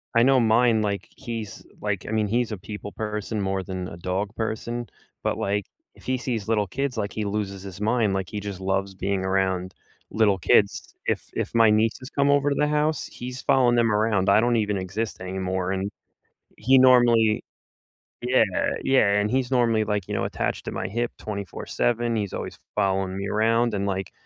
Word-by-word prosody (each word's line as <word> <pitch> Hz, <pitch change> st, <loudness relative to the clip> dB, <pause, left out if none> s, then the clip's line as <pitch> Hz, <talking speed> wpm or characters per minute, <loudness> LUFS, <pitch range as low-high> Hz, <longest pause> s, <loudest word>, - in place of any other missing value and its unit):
I 115 Hz, -, +6 dB
know 135 Hz, 0 st, +5 dB
mine, 115 Hz, 0 st, +4 dB
like 100 Hz, -1 st, -2 dB
he's, 115 Hz, -5 st, -7 dB, 0.2 s
like, 105 Hz, -2 st, -2 dB
I -, -, -4 dB
mean, 110 Hz, -1 st, +1 dB
he's 120 Hz, +1 st, 0 dB
a 105 Hz, -, -3 dB
people 100 Hz, +1 st, -8 dB
person 105 Hz, 0 st, -3 dB
more 95 Hz, -1 st, -1 dB
than 90 Hz, 0 st, -5 dB
a 85 Hz, -, -9 dB
dog 95 Hz, +3 st, -2 dB
person, 115 Hz, +1 st, -3 dB, 0.4 s
but, -, -, 0 dB
like, 100 Hz, 0 st, -1 dB, 0.3 s
if -, -, -18 dB
he 130 Hz, 0 st, 0 dB
sees 115 Hz, -4 st, -3 dB
little 105 Hz, -3 st, +1 dB
kids, 135 Hz, +3 st, -3 dB
like, 100 Hz, -1 st, -2 dB
he 110 Hz, -, -3 dB
loses 100 Hz, -2 st, -3 dB
his 95 Hz, -1 st, -8 dB
mind. 110 Hz, -2 st, +2 dB
Like 95 Hz, -2 st, -2 dB
he 105 Hz, -, -4 dB
just 100 Hz, -2 st, -6 dB
loves 95 Hz, 0 st, -1 dB
being 95 Hz, 0 st, -1 dB
around 95 Hz, -1 st, 0 dB, 0.4 s
little 105 Hz, -3 st, +3 dB
kids. 100 Hz, +3 st, +2 dB
If -, -, 0 dB
if -, -, -3 dB
my 115 Hz, -1 st, +6 dB
nieces 110 Hz, +5 st, +1 dB
come 140 Hz, 0 st, +1 dB
over 145 Hz, 0 st, +3 dB
to 140 Hz, -, 0 dB
the 150 Hz, -, +2 dB
house, 150 Hz, 0 st, +1 dB
he's 125 Hz, +1 st, -7 dB
following 125 Hz, -2 st, +4 dB
them 115 Hz, -2 st, +3 dB
around. 105 Hz, -2 st, +2 dB
I 100 Hz, -, +6 dB
don't 120 Hz, 0 st, +2 dB
even 105 Hz, -2 st, 0 dB
exist 100 Hz, +3 st, -4 dB
anymore 95 Hz, 0 st, -2 dB
and 95 Hz, +1 st, -1 dB, 0.7 s
he 130 Hz, +5 st, +5 dB
normally 120 Hz, -4 st, +5 dB, 0.8 s
Yeah, 125 Hz, -1 st, +4 dB, 0.4 s
yeah, 110 Hz, -7 st, +4 dB
and 105 Hz, +1 st, 0 dB
he's 130 Hz, -1 st, +1 dB
normally 115 Hz, -3 st, +3 dB
like, 105 Hz, -3 st, -2 dB
you -, -, -4 dB
know, -, -, 0 dB
attached -, -, -3 dB
to -, -, -4 dB
my -, -, -3 dB
hip 120 Hz, +4 st, -2 dB
24/7, 115 Hz, +3 st, -2 dB
he's 100 Hz, -3 st, -2 dB
always -, -, -5 dB, 0.2 s
following 95 Hz, -2 st, 0 dB
me 100 Hz, 0 st, -3 dB
around 115 Hz, +2 st, +2 dB
and 100 Hz, 0 st, -1 dB
like 95 Hz, -1 st, -3 dB
105 Hz, 195 wpm, -25 LUFS, 95-120 Hz, 0.8 s, I